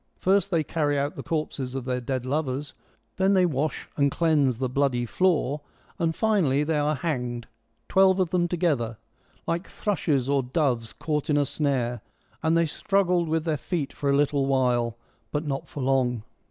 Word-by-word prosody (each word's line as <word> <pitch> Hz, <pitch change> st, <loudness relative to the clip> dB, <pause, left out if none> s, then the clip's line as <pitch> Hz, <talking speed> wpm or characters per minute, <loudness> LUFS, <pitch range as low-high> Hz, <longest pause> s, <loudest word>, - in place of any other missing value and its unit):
First, 195 Hz, +2 st, +2 dB
they 165 Hz, -4 st, +1 dB
carry 150 Hz, -1 st, 0 dB
out 140 Hz, +2 st, -1 dB
the -, -, -5 dB
corpses 140 Hz, -5 st, -3 dB
of 130 Hz, -2 st, -4 dB
their 125 Hz, -1 st, -1 dB
dead 130 Hz, 0 st, -3 dB
lovers, 145 Hz, 0 st, -2 dB, 0.4 s
then 190 Hz, +1 st, +3 dB
they 185 Hz, -1 st, +5 dB
wash 150 Hz, -1 st, -2 dB
and 140 Hz, -1 st, +3 dB
cleanse 145 Hz, -6 st, +2 dB
the 130 Hz, +1 st, -1 dB
bloody 125 Hz, -2 st, +1 dB
floor, 150 Hz, -1 st, +1 dB, 0.4 s
and 165 Hz, -1 st, 0 dB
finally 180 Hz, -11 st, +2 dB
they 150 Hz, 0 st, 0 dB
are 150 Hz, +1 st, +1 dB
hanged 125 Hz, -5 st, -3 dB, 0.2 s
— 115 Hz, 0 st, -45 dB
twelve 190 Hz, 0 st, +4 dB
of 180 Hz, -2 st, +1 dB
them 175 Hz, -1 st, +2 dB
together 150 Hz, -11 st, 0 dB, 0.2 s
— 130 Hz, -, -39 dB
' -, -, -34 dB
like 170 Hz, +3 st, -1 dB
thrushes 150 Hz, -, 0 dB
or 140 Hz, -1 st, +2 dB
doves 125 Hz, -3 st, 0 dB
caught 150 Hz, -2 st, -3 dB
in 145 Hz, -, +3 dB
a 145 Hz, -, +3 dB
snare; 125 Hz, -5 st, -1 dB, 0.4 s
and 160 Hz, +1 st, +2 dB
they 170 Hz, -, +3 dB
struggled 180 Hz, 0 st, +1 dB
with 160 Hz, 0 st, +1 dB
their 155 Hz, -2 st, 0 dB
feet 150 Hz, -2 st, -3 dB
for 140 Hz, -, -2 dB
a 140 Hz, -, +4 dB
little 140 Hz, -1 st, +2 dB
while, 120 Hz, -3 st, +1 dB, 0.3 s
but 150 Hz, +1 st, -2 dB
not 140 Hz, -2 st, -3 dB
for 140 Hz, -, -5 dB
long.' 125 Hz, -4 st, +1 dB
145 Hz, 190 wpm, -26 LUFS, 130-165 Hz, 0.4 s, they